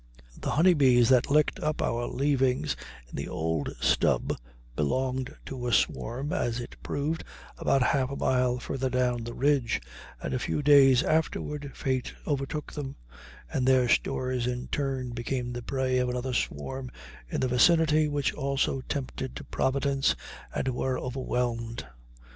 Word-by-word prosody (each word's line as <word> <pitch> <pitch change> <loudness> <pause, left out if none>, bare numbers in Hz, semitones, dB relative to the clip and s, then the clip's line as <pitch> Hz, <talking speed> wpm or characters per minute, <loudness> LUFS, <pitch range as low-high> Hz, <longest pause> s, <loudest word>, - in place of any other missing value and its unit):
The - - -4
honey 175 +5 +5
bees 125 -6 +5
that 130 0 +4
licked 150 +1 +3
up 155 0 -1
our 120 +1 0
leavings 135 -2 +1 0.3
on - - -19
the - - -4
old 80 -2 -1
stub - - +2 0.4
belonged 130 - -1
to 125 -2 -5
a - - 0
swarm, 120 - 0
as 120 0 0
it 120 - -7
proved, 150 +3 -2 0.4
about 135 - +3
half 130 0 +2
a 140 - -4
mile 125 -2 +2
farther 130 +1 -2
down 125 -1 +1
the 120 +1 -6
ridge, 140 -4 +2 0.4
and - - -4
a 130 - 0
few 145 - -1
days 135 -3 +7
afterward 150 -2 -1
fate 130 -2 -2
overtook 145 +1 -2
them, 140 -3 -5 0.6
and 130 - +1
their 130 -2 +5
stores 125 0 +1
in 125 0 -3
turn 135 -3 -2
became 120 +1 -3
the 120 - -4
prey 130 0 0
of 125 0 +1
another 125 +1 -2
swarm 130 - -3 0.4
in - - -2
the 130 - +1
vicinity, 155 +4 +4
which 145 -1 0
also 135 -1 0
tempted 130 -1 -4
Providence 135 0 +1 0.4
and 130 - -1
were 130 0 -1
overwhelmed. 120 - -2
130 Hz, 150 wpm, -28 LUFS, 125-140 Hz, 0.6 s, days